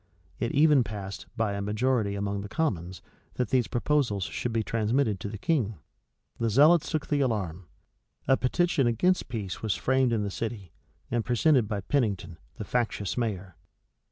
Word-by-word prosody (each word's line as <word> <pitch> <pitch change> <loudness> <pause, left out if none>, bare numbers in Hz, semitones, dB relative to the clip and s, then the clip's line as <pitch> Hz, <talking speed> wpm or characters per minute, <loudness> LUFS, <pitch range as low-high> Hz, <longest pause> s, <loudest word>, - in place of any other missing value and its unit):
It 115 - -1
even 150 -2 +5
passed 100 -2 -7
by 110 -3 0
a 100 - -3
majority 105 0 0
among 100 0 -2
the 100 - -7
commons, 95 - -2 0.3
that 125 -3 -1
these 125 -3 +2
proposals 120 -6 0
should 120 - -3
be 115 -1 0
transmitted 110 -1 0
to 100 - -5
the 105 - -6
King. 115 -4 0 0.6
The 115 - +1
zealots 150 +8 +5
took 155 -2 -1
the 145 -1 0
alarm. 95 -9 -2 0.6
A 135 - +6
petition 135 +1 +1
against 180 +12 +1
peace 105 -7 -4
was 110 -3 0
framed 130 -1 +2
in 110 -3 +1
the 100 - -3
city, 105 -5 -5 0.4
and 120 -1 +1
presented 125 0 +3
by 105 -2 -2
Pennington, 100 - -1 0.2
the 105 - -6
factious 110 -3 -1
mayor. 100 -7 -3
115 Hz, 165 wpm, -28 LUFS, 100-130 Hz, 0.6 s, A